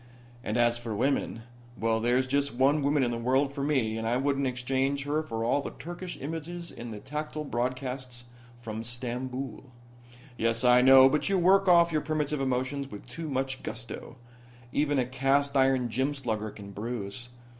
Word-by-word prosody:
And 110 -1 -1
as 120 0 +3
for 115 -2 -4
women 120 -1 0 0.3
well, 115 0 +1
there's 120 +3 +2
just 140 0 0
one 140 +4 +3
woman 140 0 +2
in 120 - +1
the 115 - -3
world 135 +4 +1
for 140 - -4
me, 125 -7 +1
and 110 - -2
I 120 +2 +2
wouldn't 140 0 +1
exchange 135 +2 -1
her 145 +2 0
for 115 -7 -4
all 140 +4 +2
the - - -7
Turkish 175 +2 -6
images 165 +4 -5
in 120 0 -8
the 110 - -6
tactile 150 +4 -4
broadcasts 125 -1 -3 0.3
from 110 -2 -6
Stamboul." 125 +1 -4 0.8
"Yes, 115 +1 +1
I 125 0 +6
know. 130 +1 +9
But 150 +6 +1
you 195 - +3
work 190 +2 +4
off 170 -1 +6
your 155 -1 +1
primitive 150 -1 -1
emotions 135 +1 -1
with 105 - -9
too 165 -2 -6
much 135 -1 -2
gusto. 120 +1 -6 0.6
Even 145 +1 +1
a 130 - +2
cast 135 +2 +1
iron 130 -2 +3
gym 130 +5 -1
slugger 110 -5 -2
can 100 -1 -10
bruise. 115 +2 -5
130 Hz, 175 wpm, -28 LUFS, 120-145 Hz, 0.8 s, know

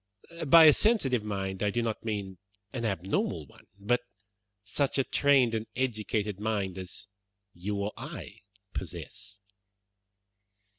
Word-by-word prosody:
By 165 +4 +9
a 155 -2 +9
sensitive 135 - +2
mind 95 -2 -3
I 105 - +2
do 120 +3 0
not 110 -2 -2
mean 100 -4 -4 0.3
an 120 -3 -2
abnormal 95 -3 -1
one, - - -20
but 115 +5 +1 0.6
such 135 +8 -1
a 135 - +4
trained 135 -4 +3
and 110 0 -2
educated 110 -5 -1
mind 100 -4 -1
as 95 +2 -8 0.5
you 100 +4 -3
or 100 +1 -2
I - - -8 0.3
possess." 100 +4 -7
105 Hz, 130 wpm, -29 LUFS, 100-120 Hz, 0.6 s, By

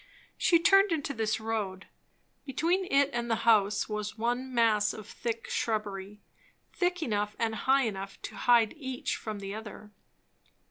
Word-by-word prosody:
She 340 - +4
turned 390 +4 +5
into 290 -3 -1
this 220 -2 -1
road. 210 -4 -3 0.6
Between 335 +7 0
it 280 +1 +4
and 235 0 -2
the 225 0 -1
house 210 -2 +4
was 210 0 -4
one 245 +3 -1
mass 220 -4 +3
of 215 - -9
thick 230 +1 -4
shrubbery, 210 -2 -3 0.5
thick 355 -2 0
enough 210 -4 -1
and 225 -1 0
high 265 +5 +2
enough 195 -3 -4
to - - -6
hide 235 -3 +4
each 260 -4 -3
from 215 -2 -5
the 195 0 -6
other. 210 -1 -9
225 Hz, 150 wpm, -29 LUFS, 210-265 Hz, 0.6 s, turned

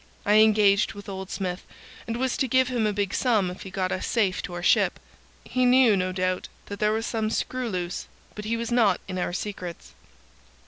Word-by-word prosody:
I 210 +1 +5
engaged 210 -2 +4
with 205 0 -11
old 190 -1 -6
Smith, 180 -1 -4 0.4
and 230 0 -2
was 260 0 0
to 265 - +1
give 260 +1 +3
him 235 -4 +1
a - - +1
big 200 -1 -2
sum 215 -8 +2
if 180 - -10
he 190 - -8
got 185 -1 -2
us 185 - -2
safe 205 -6 +1
to 180 - -7
our 175 - -5
ship. - - +3 0.5
He 255 - 0
knew, 250 -3 +5
no 185 -1 0
doubt, 185 0 -1 0.2
that 200 -1 -7
there 210 0 +2
was 220 +1 -1
some 220 -2 -1
screw 255 +2 -2
loose, 180 -3 -4 0.3
but 210 - -7
he 230 +2 -1
was 235 +1 -4
not 220 -6 +3
in 185 -1 -4
our 175 - -1
secrets. 180 -2 -6
205 Hz, 215 wpm, -25 LUFS, 185-230 Hz, 0.5 s, I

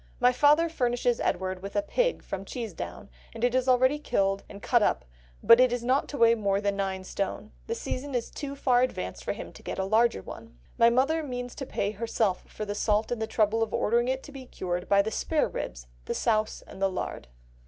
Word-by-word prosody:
"My 250 0 +5
father 295 +6 +4
furnishes 245 -5 0
him - - 0
[Edward] 185 0 -2
with 195 +1 -7
a 305 - +2
pig - - 0
from 195 0 -5
Cheesedown; 210 -2 -6 0.3
it 240 +2 +1
is 255 0 +1
already 260 +3 +4
killed 195 -8 0
and 200 - -9
cut 240 +2 +2
up, 60 - +1 0.4
but 230 - +8
it 255 -1 +5
is 245 -1 -2
not 260 +3 +2
to 290 - -5
weigh 230 -2 +6
more 200 -3 +1
than 200 -1 0
nine 190 -1 -2
stone; 200 +2 -4 0.2
the 460 - -2
season 275 - -4
is 240 - -2
too 280 -2 -6
far 250 -3 +3
advanced 255 - -2
to - - -1 0.3
get - - -5
him 190 - 0
a - - -4
larger 220 - +3
one. - - -11 0.2
My 230 - +6
mother 275 +7 +2
means 245 -4 -5
to 270 - -6
pay 200 - -1
herself 215 -3 -1
for 215 - -6
the 205 - -3
salt 210 +1 +1
and 240 -2 -2
the 220 - -1
trouble 220 0 +1
of 225 - 0
ordering 235 +3 +2
it 265 +1 -1
to 290 - -11
be 265 -2 -10
cured, 180 -4 -4
by 200 0 +5
the 220 - -3
spareribs, 220 - -2 0.2
the - - -3
souse, 215 -2 0
and 190 - -12
the 195 - +3
lard." 185 - -5
230 Hz, 220 wpm, -28 LUFS, 200-255 Hz, 0.4 s, but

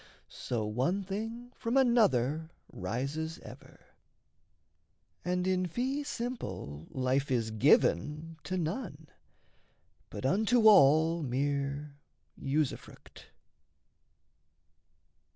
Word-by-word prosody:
So 115 -3 -3
one 130 - 0
thing 225 +5 -5
from 235 +3 -1
another 160 - +3 0.2
rises 140 - -3
ever; - - -13 1.4
And 180 0 -1
in 185 -1 +1
fee 260 - -2
simple 100 - -5
life 130 +2 0
is 115 -4 0
given 150 - +2
to 185 - -2
none, 165 - -4 1.0
But - - -6
unto 220 - +3
all 160 -2 +6
mere 140 +2 -2 0.4
usufruct. 145 0 -4
160 Hz, 80 wpm, -31 LUFS, 135-200 Hz, 1.4 s, all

